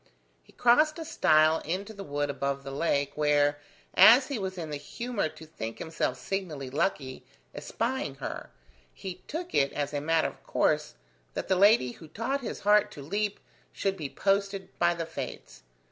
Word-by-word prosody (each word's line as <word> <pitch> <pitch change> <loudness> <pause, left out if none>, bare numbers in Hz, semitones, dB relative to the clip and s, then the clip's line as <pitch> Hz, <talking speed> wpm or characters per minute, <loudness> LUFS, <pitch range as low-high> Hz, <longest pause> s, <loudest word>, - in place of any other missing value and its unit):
He - - -22
crossed 305 +7 +4
a 325 - -5
stile 155 - +4
into 195 +7 -4
the 200 -1 -8
wood 145 -3 -2
above 140 0 -2
the 135 - -6
lake, 140 -1 0
where, 145 -1 +2 0.3
as 250 +5 +8
he 275 -5 -2
was 190 -1 -4
in 160 -3 -5
the 145 - -2
humour 230 +6 -3
to 160 - -13
think 115 -8 -6
himself 160 +5 -2
signally 155 -9 -4
lucky, 135 -4 -1 0.3
espying 230 - -3
her, 135 - -6 0.5
he 185 -2 -7
took 345 +4 -5
it 140 0 +3
as 145 0 -2
a 145 - -1
matter 165 +2 +2
of - - -18
course - - 0 0.4
that - - -4
the 190 - +4
lady 195 - +5
who 160 - -13
taught 255 - -2
his 245 - -5
heart 210 +1 +4
to 140 - -9
leap 205 +6 -2 0.3
should 195 -1 -1
be 155 -7 -5
posted 195 +1 0
by 175 0 +3
the 165 -1 -3
Fates. 130 - -7
165 Hz, 175 wpm, -28 LUFS, 145-205 Hz, 0.5 s, as